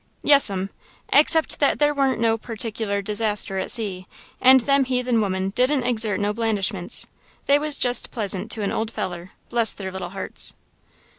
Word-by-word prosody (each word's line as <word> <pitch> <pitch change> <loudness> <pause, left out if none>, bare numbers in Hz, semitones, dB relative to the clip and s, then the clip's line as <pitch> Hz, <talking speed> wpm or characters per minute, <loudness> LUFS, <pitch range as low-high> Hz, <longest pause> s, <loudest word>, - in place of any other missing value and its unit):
"Yes'm, 200 -10 +3 0.4
except 315 +2 +3
that 285 - +2
there 295 0 +2
wa'n't 275 -2 0
no 225 -1 +2
particular 220 -3 -4
disaster 210 -2 +1
at - - -4
sea 195 -5 0 0.3
and 260 0 +6
them 275 +2 +2
heathen 250 -2 0
women 190 -1 -2
didn't 255 +4 +1
exert 225 -4 -1
no 205 +1 -1
blandishments. 205 -5 -1 0.4
They 285 +1 +3
was 300 -1 0
jest 245 0 +2
pleasant 200 -5 -1
to 215 - -5
an 200 - -2
old 220 0 -2
feller, 180 -4 -6 0.2
bless 235 -2 +3
their 190 -2 -7
little 190 -1 -6
hearts." 195 +1 -4
225 Hz, 160 wpm, -22 LUFS, 195-255 Hz, 0.4 s, and